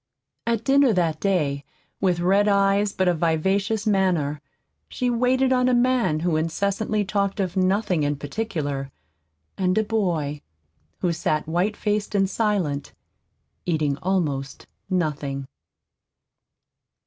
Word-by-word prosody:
At 230 -1 0
dinner 275 -2 +4
that 165 -4 0
day, 150 -8 0 0.4
with 180 -3 +1
red 195 +4 +3
eyes 200 0 +3
but 190 -1 0
a 180 - +4
vivacious 190 +7 0
manner, 180 -8 +1 0.5
she 250 -1 -1
waited 255 +2 +2
on 250 0 +3
a 250 - +3
man 240 -10 +2
who 170 -2 +1
incessantly 200 +6 -1
talked 200 +1 -1
of 185 -2 -1
nothing 185 -2 +1
in 145 0 0
particular, 145 -4 -3 0.7
and 185 0 +1
a 220 - +3
boy 170 -10 -1 0.6
who 175 -2 +1
sat 155 -2 -1
white 180 +6 0
faced 210 0 -1
and 195 -1 +3
silent, 190 -10 -1 0.7
eating 155 -4 +1
almost 155 -7 -2 0.2
nothing. 145 -6 -2
185 Hz, 125 wpm, -24 LUFS, 155-210 Hz, 0.7 s, dinner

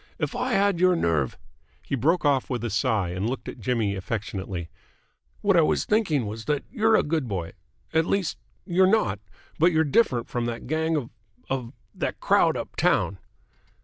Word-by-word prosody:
If - - -2
I - - -1
had 200 -3 +2
your 185 0 +5
nerve 80 - 0 0.2
!" - - -36
He - - -5
broke 155 +7 +2
off 140 -3 +2
with 120 -3 -2
a 120 - -2
sigh 105 -3 +1
and 95 +5 -2
looked 130 - -5
at - - -7
Jimmy 115 -6 0
affectionately. 95 -4 -4 0.7
"What 200 -2 +3
I 170 - +6
was 155 - +1
thinking 180 - +1
was 110 +2 -6
that 150 -2 0
you're 225 -3 +3
a - - +4
good 150 -3 -1
boy. 90 -6 -3 0.4
At 160 +1 +2
least, 195 -4 -1 0.3
you're 185 0 +4
not, 110 - +2 0.4
but 170 +3 +5
you're 160 -1 +3
different 135 - +2
from 120 -1 -2
that 120 0 -4
gang 160 +3 0
of 125 -6 -4 0.4
of 125 -3 -2 0.2
that - - -3
crowd - - +3
up - - -6
town." 95 - +1
135 Hz, 185 wpm, -25 LUFS, 105-170 Hz, 0.7 s, I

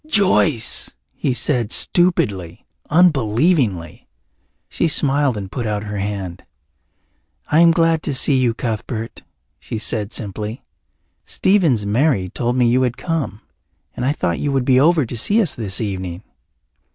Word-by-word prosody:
"Joyce!" 185 - +3 0.2
he - - -2
said, 120 -2 0
stupidly, 100 - +1 0.2
unbelievingly. 135 - +1 0.6
She 170 - -1
smiled 140 -4 +1
and 95 -2 -7
put 120 -3 -4
out 105 -1 -2
her 105 -1 -5
hand. 95 -3 -5 1.1
"I 155 - +4
am 170 0 +6
glad 165 -1 +2
to 145 - -3
see 135 +2 +3
you, 125 -3 +1
Cuthbert," 115 0 -5 0.4
she - - -6
said 110 -1 -1
simply. 105 +2 -5 0.6
"Stephen's 165 - +1
Mary 105 -3 +1
told 120 +5 -2
me 125 -2 +3
you 125 +2 +2
had 125 -1 -1
come. 145 - -3 0.5
And - - -4
I 130 - +2
thought 85 - -2
you 145 - -1
would 135 -2 0
be 130 -1 +4
over 155 0 +3
to 120 - -7
see 205 - +1
us 190 -10 +1
this 100 -5 -3
evening." 95 -3 -5
120 Hz, 145 wpm, -19 LUFS, 105-150 Hz, 1.1 s, am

